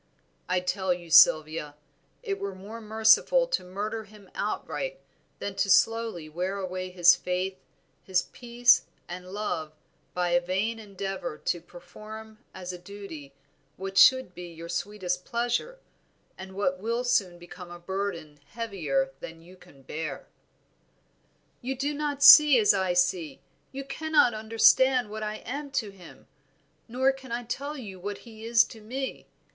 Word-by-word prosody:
I 180 0 +1
tell 190 +1 -1
you, 170 -2 -12
Sylvia, 155 -2 +5 0.5
it 400 -4 -3
were 200 -1 -4
more 210 +5 -9
merciful 220 - +4
to - - -1
murder 210 +4 -5
him 205 -2 -17
outright - - -4 0.4
than 200 - -5
to 200 - +1
slowly 225 -5 +2
wear 180 +5 -3
away 185 -1 -4
his 175 -1 +6
faith, 185 +1 -3 0.4
his 185 -1 0
peace, 240 0 +3 0.2
and 180 +1 -8
love 175 -7 -3 0.4
by 180 -1 0
a 175 0 +3
vain 195 +6 -2
endeavor 195 -5 -5
to 170 +2 -2
perform 215 +6 -12
as 185 -1 -7
a 180 - -8
duty 175 -7 -10 0.5
what 195 +1 -6
should 260 -1 +6
be 180 0 -8
your 165 0 -10
sweetest 180 0 -3
pleasure, 240 - -2 0.6
and 190 0 -10
what 185 -2 -1
will 230 +4 -2
soon 205 -8 +1
become 175 +1 -11
a 175 - -9
burden 175 -5 -5
heavier 230 - -2
than 165 0 -10
you 180 +2 -15
can 175 -7 -19
bear." 155 +3 -6 1.4
"You 265 +2 -3
do 285 +3 -2
not 290 -1 -2
see 300 -3 +10
as 215 -3 +5
I 190 -2 0
see; 175 -5 0 0.3
you 275 +1 -6
cannot 290 -2 +2
understand 225 +2 +3
what 215 0 -6
I 215 0 -3
am 285 +4 -5
to 215 -7 -1
him, 175 -9 -15 0.6
nor 260 +3 +2
can 265 -2 -12
I 240 +1 -2
tell 280 +5 -5
you 200 -8 -9
what 200 +2 -5
he 220 -2 -12
is 230 0 +5
to 220 - -12
me. 260 +5 -5
200 Hz, 150 wpm, -27 LUFS, 180-235 Hz, 1.4 s, see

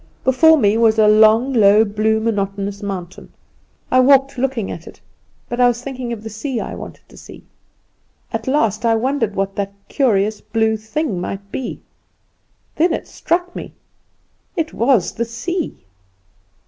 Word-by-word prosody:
Before 315 +5 +5
me 210 -5 +3
was 225 -1 +4
a 215 -1 +5
long, 220 +5 +5
low, 215 -1 +5
blue, 215 +1 0
monotonous 200 -2 -2
mountain. 190 -3 -7 0.6
I 255 - +5
walked 270 +1 +4
looking 255 -5 -2
at - - -8
it, - - -13 0.5
but 240 - -5
I 245 - +6
was 240 0 -1
thinking 255 -3 -5
of 225 -2 -6
the 220 - -6
sea 240 +3 -4
I - - -5
wanted - - -9
to - - -18
see. - - -13 0.9
At 225 +1 -4
last 230 -6 +1
I 230 -1 +3
wondered 230 -3 -1
what 195 0 -2
that 200 -1 -3 0.2
curious 215 -6 +1
blue 220 0 0
thing 220 - -3
might 195 +2 -6
be; 260 - -5 1.0
then 330 +2 +3
it - - -4
struck 355 +1 -2
me - - -8 0.8
it 320 -1 -2
was 235 -5 +2
the 235 - -2
sea! 275 - -4
225 Hz, 160 wpm, -19 LUFS, 210-260 Hz, 1.0 s, I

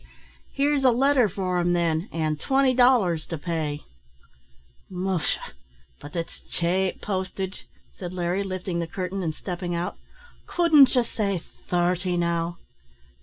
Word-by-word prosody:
"Here's 285 0 +1
a 260 - +7
letter 255 -1 +4
for 185 -1 -1
him, 175 0 +2
then, 170 +1 0
and 155 -2 -1
twenty 270 - +3
dollars 235 -11 +4
to 165 - -4
pay." 155 -2 -3 1.1
"Musha! 185 -2 -2 0.5
but 145 - -11
it's 165 -1 -4
chape 180 +2 0
postage," 190 -1 -4 0.3
said 180 -2 -5
Larry, 180 +2 -1
lifting 185 -2 -3
the 170 - -2
curtain, 185 +3 -4
and 160 -3 -2
stepping 175 -1 -4
out; 170 +1 -3 0.5
"couldn't 310 -6 +6
ye 250 - +4
say 200 -6 -2 0.2
thirty, 180 0 +1
now?" 170 0 0
180 Hz, 130 wpm, -25 LUFS, 170-205 Hz, 1.1 s, a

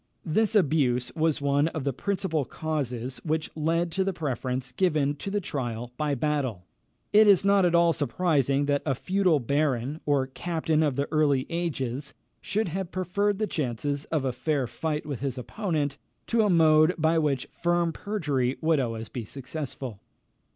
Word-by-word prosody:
This 220 +7 +1
abuse 135 - +2
was 160 -2 +1
one 140 +2 +3
of 160 -3 -4
the 140 -1 -1
principal 185 -1 -1
causes 130 -4 -3
which 155 0 -1
led 165 +2 0
to 190 +3 +1
the 195 0 -1
preference 130 -5 -3
given 150 -1 +1
to 195 - -5
the 205 +1 0
trial 120 - -4
by 150 -1 0
battle. 130 - -1 0.5
It 215 +1 +7
is 195 -1 +6
not 200 -1 +5
at 170 - +1
all 170 -1 +5
surprising 145 -1 +1
that 145 0 +1
a 135 -3 0
feudal 185 -1 +2
baron, 140 +1 0
or 140 -2 +3
captain 160 +3 -1
of 145 -4 +1
the 140 +1 -1
early 145 -4 +2
ages, 140 -5 -3 0.3
should 215 -2 -1
have 190 +1 -3
preferred 190 +3 0
the 215 - 0
chances 145 - -2
of 155 -4 -1
a 130 - 0
fair 140 +2 0
fight 150 +6 -3
with 145 -4 -4
his 135 -2 -3
opponent 150 - -2 0.3
to 230 -1 +2
a 210 - +3
mode 160 -1 +5
by 160 +1 +3
which 140 -5 0
firm 175 -1 0
perjury 145 -12 -1
would 160 -2 +2
always 115 -3 -3
be 120 0 -5
successful. 130 -2 -6
150 Hz, 170 wpm, -27 LUFS, 135-170 Hz, 0.5 s, It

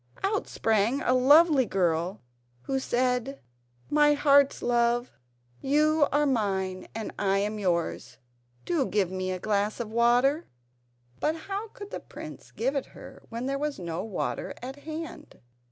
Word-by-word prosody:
out 410 +1 0
sprang 225 +4 +1
a 255 - +3
lovely 285 +3 +6
girl, 180 0 0 0.4
who 270 - -1
said: 250 +1 0 0.5
"My 295 0 +4
heart's 280 -1 +4
love, 240 0 +1 0.5
you 300 +2 +3
are 295 +1 +3
mine 190 -7 -1
and 225 -1 -5
I 195 -1 +2
am 210 +2 -1
yours; 170 - -1 0.5
do 320 -7 +1
give 190 -1 0
me 185 0 -3
a 185 - -2
glass 205 +3 -1
of 225 -2 -4
water." 245 +7 +3 0.7
But 310 +1 +1
how 395 +6 -5
could 410 -1 -11
the - - -4
prince - - -10
give 265 +5 -2
it 275 - -2
her - - -12
when 235 +2 -4
there 275 +1 -1
was 295 0 -2
no 170 0 -4
water 215 -3 -3
at 260 +2 -7
hand? 315 +2 -8
245 Hz, 150 wpm, -27 LUFS, 200-290 Hz, 0.7 s, lovely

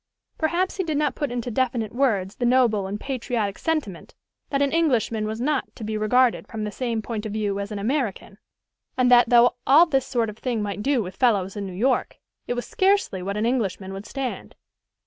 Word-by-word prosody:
Perhaps 350 +4 0
he 380 - 0
did 315 -4 -2
not 295 -1 +1
put 290 -4 -3
into 245 0 -3
definite 235 -3 -1
words 215 -8 0
the - - -3
noble 240 -6 +3
and 205 +2 -4
patriotic 235 -6 -3
sentiment 305 - -3 0.3
that 275 - 0
an 280 - +1
Englishman 240 -9 +1
was 220 +1 -4
not 280 +2 -1
to 230 - -9
be 215 0 -3
regarded 240 +4 +2
from 220 -2 -5
the 210 - -3
same 230 -2 -2
point 220 -2 -4
of 210 - -6
view 205 -2 -1
as 200 +1 -5
an 210 - -4
American, 215 -3 -2 0.6
and 250 -1 +3
that, 240 -1 +6
though 240 0 +5
all 300 +6 +7
this 270 -5 0
sort 230 -4 0
of 215 - -17
thing 245 -3 -2
might 205 -1 -3
do 265 -1 +1
with 185 0 -9
fellows 200 -7 +2
in 200 -1 -4
New 185 - -7
York, 250 +8 0 0.3
it 245 - -1
was 245 - -3
scarcely 380 - +1
what 200 +3 -3
an 215 - 0
Englishman 200 -6 -1
would 195 +2 -8
stand. 270 -2 -5
235 Hz, 210 wpm, -24 LUFS, 210-265 Hz, 0.6 s, all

